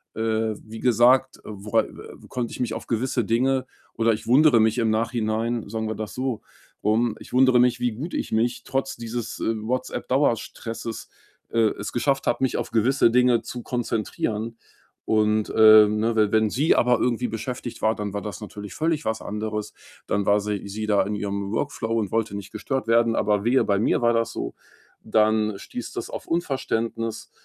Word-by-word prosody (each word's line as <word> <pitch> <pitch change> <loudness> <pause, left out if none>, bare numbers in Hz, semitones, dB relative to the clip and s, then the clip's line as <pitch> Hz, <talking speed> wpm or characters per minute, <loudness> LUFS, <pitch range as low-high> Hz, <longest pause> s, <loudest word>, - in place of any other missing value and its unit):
äh, 110 0 0
wie 110 +1 -9
gesagt, 125 +3 +3
wora 105 0 0
äh, - - -11
konnte 120 -2 -3
ich - - -8
mich 115 -3 -1
auf 115 - -6
gewisse 120 +1 0
Dinge 130 +4 +1 0.3
oder 115 0 +3
ich 105 - -6
wundere 135 0 +6
mich 110 +1 +3
im 115 -2 +2
Nachhinein, 115 0 -1
sagen 110 +1 -3
wir 110 - -3
das 110 -1 -6
so 130 -3 -3 0.4
rum 110 +1 +2
ich - - -13
wundere 130 -1 +5
mich, 125 0 +3
wie 120 -2 0
gut 150 +10 -6
ich - - -3
mich 120 +2 0
trotz 135 0 -2
dieses, 115 -1 -5
äh, 115 - 0
WhatsApp-Dauerstresses 120 -2 -2 0.4
äh, - - -3 0.2
es 100 - -4
geschafft 135 +3 0
habe, 120 +2 +1
mich 130 - +1
auf 120 0 -3
gewisse 120 +3 +3
Dinge 125 -1 +3
zu 120 +1 -7
konzentrieren 115 -1 -2 0.5
und, 110 0 +2
äh, 110 -1 +8
ne, 110 +2 0
we 105 -2 +3
wenn 110 -1 +3
sie 145 +9 +3
aber 125 -1 +3
irgendwie 125 0 0
beschäftigt 120 +2 -5
war, 110 +1 +2
dann 105 -1 -4
war 100 - -3
das 100 -4 -6
natürlich 105 -1 -8
völlig 160 -1 -1
was 110 0 -1
anderes. 105 0 -4 0.3
Dann 100 -1 0
war 105 0 +4
sie 100 -1 -3
sie 105 +2 -4
da 105 -2 +3
in 105 +2 -3
ihrem 100 -1 -3
Workflow 115 -4 -2
und 105 -4 -1
wollte 115 -2 -1
nicht 100 - -9
gestört 130 +3 -3
werden. 115 0 +3
Aber 105 -1 +1
wehe, 130 +3 +4
bei 100 -1 +1
mir 110 - +1
war 120 0 +3
das 115 -1 0
so, - - -4 0.5
dann 110 -1 +2
stieß - - -7
das - - -5
auf - - -7
Unverständnis 115 -8 -2
115 Hz, 185 wpm, -24 LUFS, 110-125 Hz, 0.5 s, äh